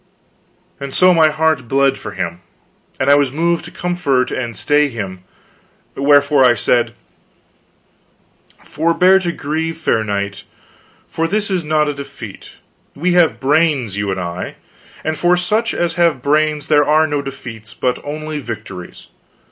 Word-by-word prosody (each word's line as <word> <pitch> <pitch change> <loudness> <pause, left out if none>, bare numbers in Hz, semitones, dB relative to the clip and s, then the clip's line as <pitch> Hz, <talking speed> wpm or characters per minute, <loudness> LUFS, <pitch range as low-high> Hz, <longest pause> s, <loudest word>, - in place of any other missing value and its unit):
And 140 -1 -6
so 185 0 +5
my 160 -2 +5
heart 155 -4 0
bled 135 +2 +2
for - - -8
him, - - -4 0.6
and 130 - 0
I 140 - +7
was 145 -2 +3
moved 170 +3 0
to - - -8
comfort 145 -8 -1
and 120 -3 -3
stay 145 +7 +2
him. 95 -6 -6 0.7
Wherefore 145 0 +4
I 125 -1 +5
said: 120 +2 +1 1.7
"Forbear 175 +5 +3
to 175 -2 -2
grieve, 160 +1 -3
fair 115 -8 0
knight, 100 -1 -3 0.6
for 165 0 -2
this 205 +2 -1
is 180 -3 0
not 155 0 +1
a 145 - -1
defeat. 140 0 -10 0.4
We 175 +5 0
have 175 -2 +3
brains, 140 - +1
you 100 0 -2
and 95 -1 -2
I; 90 0 -5 0.5
and 160 -1 -2
for 175 +2 +3
such 215 +6 0
as 175 -1 -1
have 155 -7 +2
brains 150 +1 +1
there 145 -1 +4
are 155 +2 +3
no 145 -2 -1
defeats, 115 -5 -9
but 125 -1 -1
only 155 +1 -5
victories. 105 -8 -8
145 Hz, 150 wpm, -17 LUFS, 125-165 Hz, 1.7 s, I